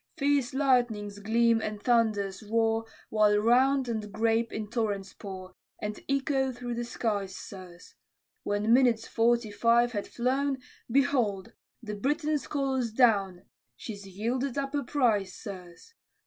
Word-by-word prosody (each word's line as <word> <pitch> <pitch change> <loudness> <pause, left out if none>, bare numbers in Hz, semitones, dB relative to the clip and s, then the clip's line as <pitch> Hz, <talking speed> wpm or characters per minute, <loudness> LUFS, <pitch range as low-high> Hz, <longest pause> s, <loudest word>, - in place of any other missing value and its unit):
Fierce 280 -3 +1
lightnings 240 -7 +1
gleam 230 +2 +2
and 215 -1 -4
thunders 215 -4 +1
roar, 225 +1 +1 0.3
While 210 -1 +4
round 255 +5 +3
and 215 -3 -3
grape 225 +1 +1
in 215 -1 -4
torrents 205 -4 -2
pour, 185 -2 -9 0.3
And 210 0 -5
echo 270 -1 +1
through 245 -1 -5
the 240 0 -3
skies, 205 -5 -2
sirs; 180 -3 -11 0.5
When 205 +2 +1
minutes 240 -3 +3
forty 235 -1 +1
five 235 +3 +3
had 205 -4 -3
flown, 265 +3 0 0.3
Behold 240 -7 +1 0.3
the 210 -2 -5
Briton's 295 +7 -1
colors 265 -5 -1
down! 200 -7 +2 0.3
She's 200 - -8
yielded 240 +7 -2
up 275 0 -2
a 290 - +1
prize, 220 -9 +1
sirs. 185 - -10
230 Hz, 135 wpm, -28 LUFS, 205-255 Hz, 0.5 s, While